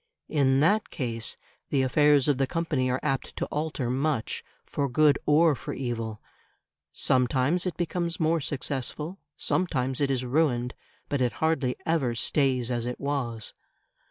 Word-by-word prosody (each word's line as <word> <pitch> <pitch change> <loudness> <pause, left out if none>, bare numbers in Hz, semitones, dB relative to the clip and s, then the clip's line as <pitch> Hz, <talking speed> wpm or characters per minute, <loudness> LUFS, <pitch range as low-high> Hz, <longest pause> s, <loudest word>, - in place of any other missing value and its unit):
In 135 -3 +3
that 205 +7 +3
case 115 -4 -3 0.3
the 135 -2 +2
affairs 145 +1 +4
of 140 -3 +2
the 135 - +2
company 150 -5 0
are 125 +1 0
apt 135 -3 -2
to - - -2
alter 150 -4 -2
much, 135 -2 -1 0.2
for 140 -1 -1
good 145 +2 +4
or 155 +2 +5
for 130 - -5
evil; 115 -4 -3 0.7
sometimes 130 +8 +2
it 180 - -3
becomes 170 -1 -2
more 160 0 +2
successful, 145 +6 -3 0.2
sometimes 135 -7 0
it 140 - +2
is 130 -2 0
ruined, 125 -3 +1 0.3
but 140 -2 -1
it 125 -1 +1
hardly 150 -6 0
ever 150 -8 +1
stays 130 -1 +1
as 120 -1 -1
it 125 - -4
was. 125 -6 -3
135 Hz, 150 wpm, -27 LUFS, 125-155 Hz, 0.7 s, or